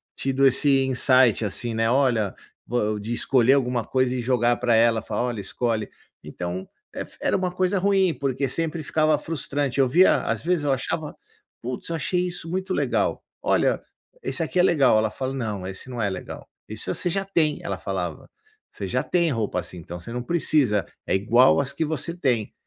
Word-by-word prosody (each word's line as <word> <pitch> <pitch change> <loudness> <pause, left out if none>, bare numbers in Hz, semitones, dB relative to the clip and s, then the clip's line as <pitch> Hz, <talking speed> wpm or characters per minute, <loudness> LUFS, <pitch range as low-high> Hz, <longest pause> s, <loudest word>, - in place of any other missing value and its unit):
tido 135 0 +2
esse 135 0 +3
insight 130 -3 +3
assim, 115 +3 -1
né, 115 +1 +1
olha, 120 -7 +2 0.3
vo 110 -3 0
de 110 +3 -6
escolher 125 +1 +3
alguma 125 -4 +1
coisa 130 +1 0
e 125 - -2
jogar 120 -1 +2
pra 120 -2 +2
ela 115 0 +4
e - - -19
falar: 105 +1 -2
"Olha 120 -3 -2
escolhe". 110 +1 -2 0.3
Então 90 +4 -5 0.3
ef - - -7
era - - +1
uma 185 -1 0
coisa 185 +2 0
ruim 190 -2 +3
porque 135 -1 -1
sempre 165 +4 -2
ficava 155 0 +2
frustrante, 145 -4 -3
eu 130 - +4
via 175 +9 +5
às - - -2
vezes 175 -2 +1
eu 145 - +1
achava, 150 +4 -2 0.5
putz 125 +5 -5
eu 165 - -1
achei 180 +5 0
isso 175 -2 -4
muito 185 +1 -2
legal: - - 0 0.2
"Olha, - - +2 0.4
esse - - -2
aqui 165 +3 -2
é - - +6
legal", 145 -11 +4
ela 110 0 +2
fala: 130 +4 -4
"Não, 105 -7 -3
esse 95 +6 -8
não 120 -2 -4
é 100 - +1
legal 95 - -7 0.2
isso 110 - -4
você 180 - -1
já 195 +3 -1
tem", 160 -6 +1
ela 100 - -3
falava: 95 -4 -4 0.4
"Você - - -6
já - - 0
tem 170 -2 +1
roupa 110 -6 -1
assim, 90 +1 -7
então 85 +2 -8
você 90 - -9
não 125 0 -3
precisa, 135 - +2 0.2
é - - -1
igual 120 +8 +4
as 140 - -1
que 165 - -1
você 160 +2 -3
tem". 125 - 0
130 Hz, 195 wpm, -24 LUFS, 110-155 Hz, 0.5 s, é